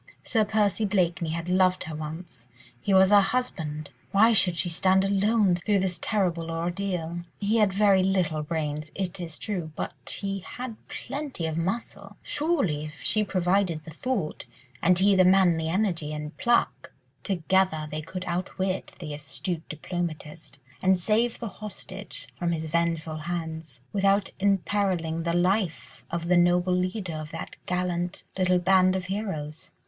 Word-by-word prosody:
Sir 220 -3 +2
Percy 210 0 +1
Blakeney 175 -5 +1
had 165 +1 -3
loved 185 0 +3
her 160 - -6
once; 155 -5 -7 0.3
he 165 - -2
was 190 0 +6
her 205 -1 +8
husband; 165 -9 -2 0.2
why 220 +4 +6
should 180 -5 +4
she 175 - +1
stand 190 +3 +3
alone 200 0 +3
through 200 +4 +1
this 185 -2 0
terrible 175 -6 0
ordeal? 175 0 -2 0.2
He 210 +2 +1
had 210 -3 +4
very 195 -1 +4
little 185 -5 +1
brains, 150 -1 -3
it 190 -2 -3
is 165 -3 -6
true, 180 -7 -4
but - - -4
he 195 -1 -2
had 245 +5 -7
plenty 275 - -4
of 160 -1 -2
muscle: 195 +3 -3
surely, 285 - 0
if 150 0 -10
she 215 - +2
provided 185 -4 +1
the 160 - -10
thought, 195 - -3 0.3
and 180 +1 +4
he 200 +2 +5
the 185 -1 +6
manly 180 -4 +4
energy 170 -5 0
and 150 +1 -6
pluck, 235 0 +1 0.3
together 185 -3 +1
they 155 +1 -3
could 185 +4 -6
outwit 185 +1 -2
the 155 -4 -6
astute 155 +3 -5
diplomatist, 155 -2 -5 0.2
and 190 0 +4
save 220 +6 +1
the 235 - -5
hostage 210 +1 -7
from 170 -1 0
his 160 -1 -4
vengeful 165 -1 0
hands, 160 -4 -5
without 195 0 +2
imperilling 190 -4 +1
the 170 - +1
life 180 -1 0
of 170 0 -3
the 180 0 +4
noble 175 +1 +3
leader 185 0 -1
of 155 0 -5
that 165 0 -7
gallant 180 -1 -1
little 185 -1 +3
band 185 +1 +4
of 185 -1 -2
heroes. 185 -7 -4
180 Hz, 155 wpm, -27 LUFS, 165-195 Hz, 0.3 s, her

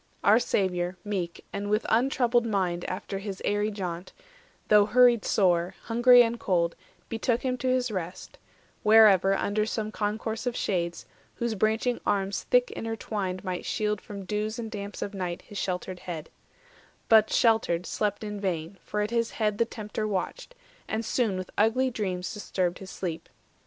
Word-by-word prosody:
400 205 - +5
Our 225 - +6
Saviour, 180 -5 0
meek, 185 -5 -4
and 200 +1 -3
with 210 +1 +1
untroubled 240 0 +2
mind 180 -5 -1
After 195 +1 -4
hisaerie 205 +1 -1
jaunt, 180 -3 -5 0.5
though 210 -1 +6
hurried 245 -1 +5
sore, 180 -2 +2
Hungry 245 +1 +6
and 235 0 -2
cold, 170 -2 +1 0.3
betook 230 +1 -1
him 255 -1 0
to 260 - -2
his 255 -2 +1
rest, 185 -2 -6 0.4
Wherever, 210 -3 +6
under 210 +1 0
some 215 -1 -3
concourse 220 +3 -3
of 245 - -1
shades, 170 -6 -2 0.3
Whose 235 -1 -1
branching 220 +4 0
arms 195 -1 -1
thick - - +4
intertwined 205 -4 -4
might 185 -2 -3
shield 210 -1 -1
From 200 -2 -8
dews 210 +3 -2
and 225 -2 -5
damps 205 -1 -5
of 205 - -5
night 180 -3 -4
his 205 - -7
sheltered 185 -1 -3
head; 165 -4 -7 0.8
But, 220 -1 +6
sheltered, 220 -7 +2
slept 210 0 -2
in 210 -1 -5
vain; 175 -1 -3
for 210 - -2
at 210 +2 -2
his 230 -1 +1
head 210 -2 -1
The 230 - +4
Tempter 215 -1 -4
watched, 215 - -4 0.3
and 220 +1 -2
soon 220 -5 0
with 185 0 -6
ugly 255 +5 +3
dreams 185 -5 -3
Disturbed 185 -4 -2
his 190 - -9
sleep. 170 -5 -5
210 Hz, 160 wpm, -27 LUFS, 185-225 Hz, 0.8 s, Our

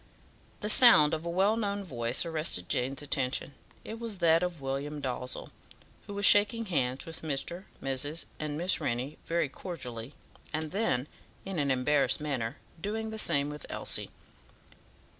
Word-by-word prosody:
The 210 - -2
sound 185 - +8
of 160 +2 -2
a - - -1
well 190 +5 +3
known 205 -2 -1
voice 120 -5 0
arrested 155 - 0
Jane's 135 +3 -1
attention: 135 -1 0 0.3
it 225 +1 -7
was 230 -4 -4
that 165 -1 +4
of 180 -3 -2
William 140 +2 -3
Dalzell, 125 -2 -4 0.6
who 205 - -6
was 200 0 +1
shaking 210 +3 +5
hands 135 -8 0
with 165 0 -8
Mr., 160 +5 -3 0.2
Mrs., 145 +4 -2
and 150 -1 -3
Miss 175 +3 +3
Rennie 125 +5 -2
very 170 -2 +1
cordially, 130 -6 -7 0.4
and 155 0 -3
then, 170 - 0 0.4
in 190 -3 -3
an 140 -1 +1
embarrassed 135 +2 +2
manner, 135 -4 -2 0.2
doing 220 +3 -3
the 220 - -4
same 145 -6 +2
with 150 -1 -8
Elsie. - - -1
150 Hz, 155 wpm, -30 LUFS, 135-190 Hz, 0.6 s, sound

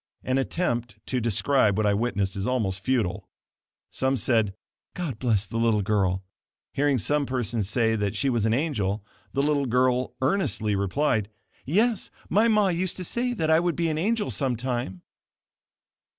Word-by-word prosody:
An 130 +1 +1
attempt 120 - -1
to 125 -2 -1
describe 110 -1 +2
what 110 - +1
I 105 - +3
witnessed 100 -3 -1
is 100 +3 -2
almost 110 -7 0
futile. 100 -6 -1 0.6
Some 130 0 0
said: 110 -6 +1 0.4
"God 150 -11 -4
bless 110 -5 +1
the 115 +4 -4
little 115 -3 +2
girl." 95 -2 +1 0.5
Hearing 145 -1 +2
some 145 +4 0
person 120 -3 -1
say 110 +3 +1
that 105 -1 -1
she 135 - 0
was 120 -4 +1
an 110 - +2
angel, 105 -9 -1 0.3
the 140 - +1
little 145 -2 +1
girl 125 +1 +1
earnestly 130 - +1
replied: 105 +2 0 0.4
"Yes, 215 - +1 0.2
my 215 +3 +4
ma 210 -3 +3
used 180 0 -1
to 185 - -4
say 245 +7 -1
that 160 -8 0
I 160 - +6
would 175 -1 0
be 170 -1 0
an 155 0 -1
angel 215 +4 0
some 135 -4 0
time." 120 -7 -3
125 Hz, 165 wpm, -26 LUFS, 105-150 Hz, 0.6 s, I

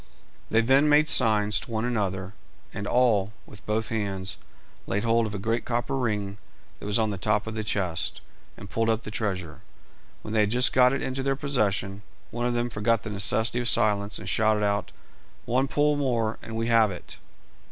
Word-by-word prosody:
They 110 - +3
then 135 +5 +4
made 150 +1 +5
signs 105 -6 +4
to - - -10
one 110 0 -2
another, 95 -5 -2 0.4
and 100 - -5
all, 110 -5 +2
with 105 - -14
both 110 +1 -1
hands, 95 -4 -3 0.5
laid 105 +2 -1
hold 115 0 +2
of 105 - -6
a - - -2
great 115 +4 -1
copper 120 +3 -2
ring 105 -5 -2 0.4
that - - -7
was 105 - +1
on 110 -2 +1
the 100 - -5
top 105 +1 0
of 110 - -5
the 110 0 -3
chest, 95 -5 -2 0.4
and 100 - -10
pulled 115 +3 -1
up 115 +1 0
the 110 - -7
treasure. 95 -8 -4 0.6
When 110 - -6
they 110 - +2
had 105 -1 +3
just 125 +3 +3
got 125 -1 +5
it 135 - -2
into 130 +1 -2
their 135 0 0
possession, 105 -9 -1 0.3
one 120 +1 -2
of 120 - -1
them 120 0 -1
forgot 105 0 +1
the 110 - -6
necessity 110 +4 +1
of 120 -1 +2
silence, 105 -2 +2
and - - -9
shouted 110 -2 +2
out 100 0 -1 0.5
"One 130 +3 +1
pull 145 +2 +2
more, 120 -6 -1
and 115 - -8
we 115 0 -1
have 115 -2 +4
it!" 90 -3 -9
110 Hz, 200 wpm, -26 LUFS, 105-120 Hz, 0.6 s, made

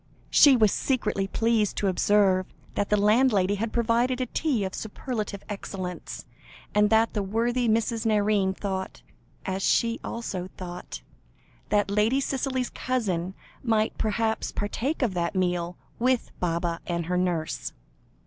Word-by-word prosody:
She 280 -4 +7
was 215 -3 +4
secretly 210 -7 0
pleased 225 0 +1
to 200 - +1
observe 190 0 +3 0.3
that 205 - -1
the 210 - +3
landlady 210 -2 +3
had 215 +2 -2
provided 235 +2 +1
a 255 - 0
tea 250 -3 0
of 190 -1 -3
superlative 215 -2 -4
excellence, 190 -3 -6 0.5
and 210 0 +4
that 225 +1 +3
the 210 - 0
worthy 235 +4 0
Mrs. 225 +1 +1
Nairne 205 -3 +2
thought, 190 -2 -4 0.4
as 190 0 -2
she 230 +3 +2
also 190 -6 -4
thought, 175 - -7 0.7
that 205 -1 +2
Lady 215 +6 +3
Cicely's 265 -2 -1
cousin 190 -8 -2 0.3
might 220 -2 +1
perhaps 220 +1 0
partake 260 +8 -2
of 225 -6 +1
that 170 0 -1
meal 175 -1 0 0.2
with 255 0 +1
Baba 170 -1 -1
and 170 -1 -1
her 180 +2 -1
nurse. 165 - -1
210 Hz, 140 wpm, -26 LUFS, 190-230 Hz, 0.7 s, She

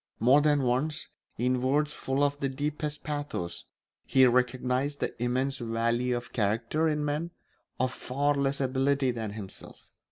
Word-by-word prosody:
More 130 +6 +5
than 145 -2 +3
once, 135 +5 -1 0.3
in 125 +1 +1
words 145 +3 +1
full 135 +2 -1
of 145 0 +1
the 135 - 0
deepest 150 +2 -3
pathos, 145 - -4 0.4
he 130 -1 +5
recognised 125 +3 +1
the - - -2
immense 130 +3 0
value 120 +1 0
of 120 - -8
character 115 +9 +1
in 150 -1 0
men 150 +3 -1 0.5
of 130 0 +1
far 140 +4 0
less 140 -1 0
ability 135 0 +1
than 110 -3 -4
himself. 105 -3 -10
130 Hz, 150 wpm, -29 LUFS, 125-145 Hz, 0.5 s, More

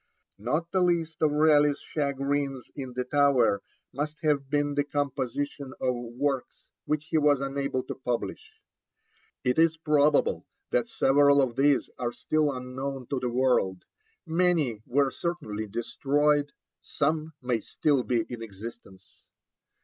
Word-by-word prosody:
Not 150 +10 -1
the 190 - +2
least 165 -3 0
of 155 - +4
Raleigh's 150 -1 +4
chagrins 140 -2 -2
in 130 -3 -6
the 125 +1 -2
Tower 130 -6 +3 0.3
must 150 +3 -3
have 140 -3 +1
been 145 0 +1
the 145 0 +1
composition 140 -1 -3
of 130 -1 +1
works 125 +3 -3 0.2
which 150 0 -1
he 160 - +2
was 145 -2 +4
unable 140 -1 -2
to - - -5
publish. 125 -2 -5 0.8
It 125 +4 +1
is 160 0 +4
probable 150 -2 +2 0.2
that 120 - +1
several 140 +1 +4
of 130 -4 +1
these 140 0 +3
are 120 -1 -1
still 155 +2 +1
unknown 130 0 -5
to 135 - 0
the 125 -1 -2
world; 120 -7 +1 0.4
many 165 -9 +1
were 135 +1 +2
certainly 120 -13 -4
destroyed, 145 +6 +1 0.3
some 155 +2 -1
may 125 -2 0
still 140 +4 +1
be 120 -2 0
in 120 -2 -7
existence. 100 -4 -11
140 Hz, 135 wpm, -27 LUFS, 125-150 Hz, 0.8 s, of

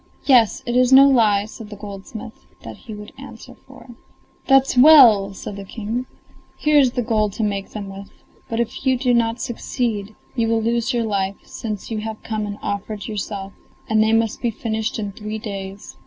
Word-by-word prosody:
"Yes, 245 -6 +4
it 240 - -2
is 250 0 +4
no 270 +1 +9
lie," 215 -6 +3
said 215 0 -11
the 210 - -8
goldsmith; 210 +3 -10 0.2
that - - -8
he 225 - -11
would 210 +1 -10
answer - - -11
for. - - -15 0.6
"That's 270 -1 +4
well!" 245 -8 +7
said 200 - -7
the 200 - -7
King. 225 +5 -5 0.5
"Here 300 -1 +4
is 260 -3 +3
the 245 - -1
gold 215 -3 0
to 225 - -3
make 200 -2 -2
them 205 -2 -7
with; 195 0 -9 0.4
but 230 - -2
if 235 +2 -3
you 260 -1 +2
do 250 -1 +1
not 230 0 +1
succeed 225 -4 -3 0.2
you 230 -2 +1
will 225 0 +2
lose 235 +2 0
your 240 -2 0
life, 200 -2 -1
since 215 -1 -6
you 220 - -2
have 220 0 -6
come 215 -2 -3
and 205 0 -6
offered 205 +1 -4
yourself, 200 -2 -5 0.3
and 220 -1 +2
they 220 0 +3
must 225 -1 +1
be 240 - +1
finished 220 -1 -3
in 205 -2 -4
three 215 +2 -6
days." 200 -2 -7
220 Hz, 195 wpm, -21 LUFS, 205-240 Hz, 0.6 s, no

